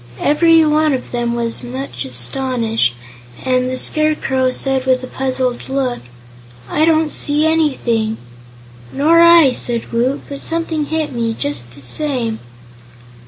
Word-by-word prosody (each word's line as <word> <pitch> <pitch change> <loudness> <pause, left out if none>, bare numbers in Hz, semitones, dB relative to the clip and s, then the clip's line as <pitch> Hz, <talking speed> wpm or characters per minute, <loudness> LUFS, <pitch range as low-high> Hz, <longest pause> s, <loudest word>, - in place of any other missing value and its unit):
Everyone 310 -1 +4
of 260 - -4
them 240 -1 -1
was 235 -1 -2
much 125 +1 -6
astonished, 225 - -1 0.5
and 255 -1 +1
the 255 - -3
Scarecrow 270 -4 +1
said 265 0 -1
with 255 0 +2
a - - -5
puzzled 255 -2 -2
look: 265 -2 -1 0.7
"I 310 - +2
don't 320 -1 +2
see 295 +1 0
anything." 250 -9 +1 0.7
"Nor 320 +4 +3
I," 335 -5 +7
said 240 -2 -4
Woot; 250 +4 0
"but 280 -1 -7
something 325 -2 -2
hit 315 0 -2
me, 230 -2 -1
just 120 -4 -4
the 140 - -13
same." 235 - -2
260 Hz, 130 wpm, -17 LUFS, 230-305 Hz, 0.7 s, I